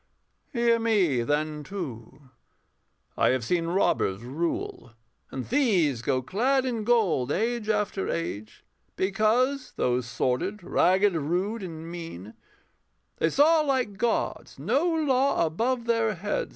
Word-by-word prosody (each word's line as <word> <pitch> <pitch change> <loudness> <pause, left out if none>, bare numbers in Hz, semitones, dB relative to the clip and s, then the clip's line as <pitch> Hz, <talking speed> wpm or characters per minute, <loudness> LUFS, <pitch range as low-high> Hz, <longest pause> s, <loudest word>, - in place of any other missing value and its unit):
Hear 235 -1 +2
me, 195 - +2
then, 150 +4 -1
too: 140 - -8 0.8
I - - +3
have 130 -2 +1
seen 165 +4 0
robbers 120 - +1
rule, 135 -3 -4 0.4
And 130 -2 -5
thieves 185 - +2
go 130 +1 0
clad 260 - +1
in 235 -4 -2
gold 200 - +2
age 230 +2 -1
after 210 -2 0
age 110 -10 -5 0.3
Because, 230 +7 +1
though 125 0 +1
sordid, 130 - -2
ragged, 190 +2 +3
rude, 180 +8 -1
and 165 -3 -7
mean, 165 - -8 0.8
They 160 - +2
saw, 310 - +4
like 255 -9 -1
gods, 235 0 -1
no 260 - +1
law 280 - +2
above 230 +9 -1
their 230 -2 +1
heads. 205 +4 -2
190 Hz, 125 wpm, -26 LUFS, 150-235 Hz, 0.8 s, saw